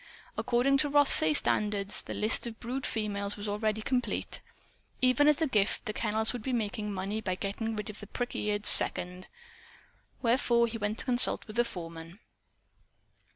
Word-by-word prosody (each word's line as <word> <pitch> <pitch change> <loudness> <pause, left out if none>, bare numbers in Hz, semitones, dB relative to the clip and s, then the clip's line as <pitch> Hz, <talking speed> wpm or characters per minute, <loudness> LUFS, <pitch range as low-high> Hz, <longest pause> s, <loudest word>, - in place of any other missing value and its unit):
According 250 +3 +1
to 295 0 +1
Rothsay 280 - +4
standards, 205 +2 +1
the - - -7
list 215 +2 0
of 225 -1 -9
brood 255 +3 -4
females 205 -2 -3
was 205 +1 -6
already 215 +1 -2
complete. 250 0 -2 0.6
Even 255 +3 +3
as 300 -1 +4
a 320 - +2
gift, 210 -6 0
the 215 - -3
kennels 220 +1 0
would 245 - -5
be 260 +3 -3
making 215 -2 -3
money 200 +3 -4
by 185 -4 -2
getting 210 +4 -4
rid 210 0 -5
of 210 - -14
the 210 - -10
prick 245 +4 -5
eared 210 0 -2
"second." 180 +1 +5 1.0
Wherefore 235 0 +2
he 230 0 -5
went 210 +1 -2
to - - -1
consult 250 -2 +3
with 215 -2 -11
the 240 - +4
foreman. 165 -3 -9
215 Hz, 170 wpm, -29 LUFS, 205-245 Hz, 1.0 s, second